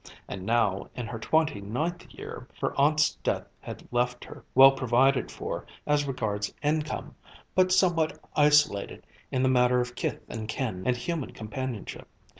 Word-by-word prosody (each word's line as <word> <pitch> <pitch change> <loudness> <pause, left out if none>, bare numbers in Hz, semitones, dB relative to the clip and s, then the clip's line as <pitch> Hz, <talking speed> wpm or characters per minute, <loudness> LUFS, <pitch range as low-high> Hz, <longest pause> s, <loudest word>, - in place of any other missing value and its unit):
And 95 -1 -6
now, 110 -5 +1
in 125 - -4
her 115 0 -6
twenty 155 -1 +1
ninth 155 - -3
year, - - -9
her - - -1
aunt's 150 +2 +3
death - - -1
had - - -9
left 125 0 0
her, - - -11
well 135 +1 +10
provided 130 0 +2
for - - -5 0.2
as 145 -1 +2
regards 105 -6 -2
income, 155 +1 -1 0.4
but 185 0 +3
somewhat 175 -4 +3 0.2
isolated 150 -8 +3 0.3
in 130 0 +1
the - - +4
matter 125 -1 +4
of 125 0 -2
kith - - -3
and 110 -1 -6
kin 110 -5 -3
and 125 -1 +2
human 155 +3 -3
companionship. 115 0 -6
130 Hz, 155 wpm, -28 LUFS, 115-150 Hz, 0.4 s, well